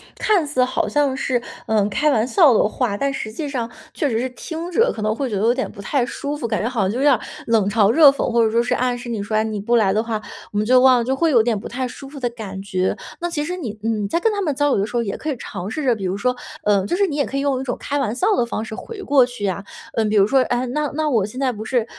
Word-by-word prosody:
看 380 -8 +2
似 255 -3 +2
好 250 -4 0
像 275 +4 +1
是， 255 -2 0 0.2
嗯， 210 -2 +1
开 300 +9 +1
玩 225 -6 +2
笑 295 0 +5
的 215 - +4
话， 215 0 -1
但 275 +6 -1
实 245 -5 -4
际 285 +7 -5
上 240 -4 -3 0.2
确 295 - 0
实 225 - 0
是 255 +3 -1
听 325 +7 -6
着 460 +7 +3
可 220 - -6
能 215 0 +1
会 260 +3 -3
觉 210 - -3
得 195 - -1
有 230 +3 +4
点 260 +1 -2
不 200 - -10
太 250 +5 0
舒 285 +3 -4
服， 245 - -3
感 215 -2 -1
觉 230 - 0
好 250 -3 -3
像 190 - +1
就 210 - -3
有 - - 0
点 290 - +6
儿 - - +1 0.3
冷 225 -4 +3
嘲 205 0 +4
热 295 +3 +8
讽， 275 -2 -1
或 235 -1 +3
者 - - +2
说 230 +2 +2
是 245 +1 0
暗 250 0 0
示 240 0 -8
你 225 -3 -2
说： 205 +2 -3
“哎， 215 - +3
你 215 -1 -3
不 235 +4 +1
来 215 -5 +4
的 215 +3 +2
话， 225 -2 -3 0.3
我 - - -2
们 210 - +1
就 255 +3 +5
忘 255 0 +6
了。” - - 0
就 260 +3 0
会 325 +5 +2
有 240 -7 +5
点 225 -3 0
不 - - -7
太 255 +1 -3
舒 255 +2 -8
服 280 +1 -11
的 245 - 0
感 205 -5 -7
觉。 185 -2 -1 0.2
那 345 - -2
其 310 -4 -2
实 355 +4 -4
你， 230 - -5
嗯， 220 -2 0
你 - - -1
在 205 - 0
跟 450 - +3
他 410 - -2
们 305 -7 -1
交 290 +1 +2
流 - - +2
的 200 - 0
时 235 - -8
候 235 - +2
也 200 - -4
可 310 - -4
以 290 - -1
尝 195 -5 -6
试 310 +7 -4
着， 255 -3 +3
比 205 -4 -4
如 185 +1 -1
说， 250 +5 0 0.3
呃， 200 -2 +2
就 275 - -1
是 400 +2 +3
你 305 -6 -3
也 285 - +2
可 - - -6
以 275 - 0
用 275 -2 0
一 - - -3
种 245 - -2
开 285 0 -2
玩 235 -5 -1
笑 365 - +1
的 235 - +2
方 225 -2 -3
式 220 - -7
回 445 - -8
过 280 -8 +4
去 245 -4 -9
呀。 200 0 -1 0.3
嗯， 225 -2 +1
比 215 - 0
如 200 -2 +6
说： 265 +6 +3
“哎， 245 +1 0
那 295 +4 -1
那 310 0 0
我 225 -8 +2
现 215 +5 -9
在 265 -1 +1
不 215 -2 -7
是， 240 -1 0
245 Hz, 350 characters per minute, -21 LUFS, 215-280 Hz, 0.3 s, 热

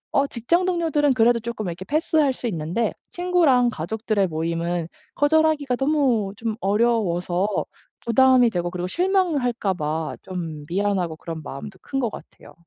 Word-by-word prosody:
어 280 0 +3
직장 335 +11 0
동료들은 320 -6 +2
그래도 235 0 +4
쪼끔 230 -2 -5
이렇게 175 +2 -6
패스할 305 - +2
수 250 - -8
있는데 180 +4 -1 0.2
친구랑 335 -9 +3
가족들의 210 +3 -1
모임은 165 +1 -2 0.3
거절하기가 295 -3 +2
너무 270 -9 +1
좀 225 -1 -2
어려워서 195 -4 +1 0.5
부담이 250 0 +5
되고 175 -2 -1
그리고 180 0 -4
실망할까 305 - +1
봐 155 -1 -3
좀 165 -5 -6
미안하고 185 -3 0
그런 160 0 -7
마음도 185 +8 -8
큰 270 - -3
것 235 -4 0
같아요. - - -13
225 Hz, 340 characters per minute, -23 LUFS, 175-280 Hz, 0.5 s, 부담이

